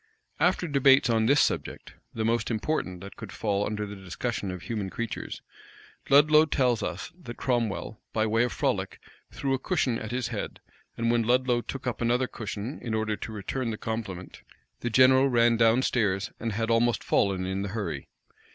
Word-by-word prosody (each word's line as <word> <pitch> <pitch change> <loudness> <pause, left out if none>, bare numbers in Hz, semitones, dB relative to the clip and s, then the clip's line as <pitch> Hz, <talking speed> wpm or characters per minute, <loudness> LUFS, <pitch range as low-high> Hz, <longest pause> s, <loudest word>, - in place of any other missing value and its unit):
After 180 -1 +2
debates 135 -4 +5
on 110 -1 +2
this 140 +3 +5
subject, - - -1 0.2
the 110 -1 -2
most 115 0 +1
important 110 - -2
that 100 0 -9
could - - -9
fall 105 -2 -1
under 105 0 -3
the 105 0 -7
discussion 100 +3 -4
of 90 -1 -6
human 105 -5 -3
creatures, 115 +3 -5 0.7
Ludlow 150 +2 +7
tells 125 -6 +1
us 90 - -4
that 140 -10 -9
Cromwell, 115 -4 -1
by 110 -1 +1
way 115 +2 +2
of 125 - -1
frolic, - - -1 0.3
threw 135 -1 -2
a 135 - 0
cushion 130 -10 0
at 110 - -6
his 125 0 -2
head; 110 -4 -5 0.4
and 115 0 +1
when 120 0 +3
Ludlow 125 +1 +2
took 135 +3 -7
up 120 -2 -3
another 120 +2 +2
cushion, 110 +2 -6
in 115 -3 -2
order 110 -1 0
to 110 - -7
return 115 +4 -3
the 110 - -3
compliment, 105 -6 -5 0.4
the 120 - -2
general 130 +3 +5
ran 120 -1 +4
down 115 +2 +4
stairs, 100 -7 0
and 115 -2 -2
had 115 +2 -1
almost 115 +1 +2
fallen 95 -2 +1
in 95 +1 -2
the 100 - -3
hurry. 90 - -4
115 Hz, 185 wpm, -27 LUFS, 105-125 Hz, 0.7 s, Ludlow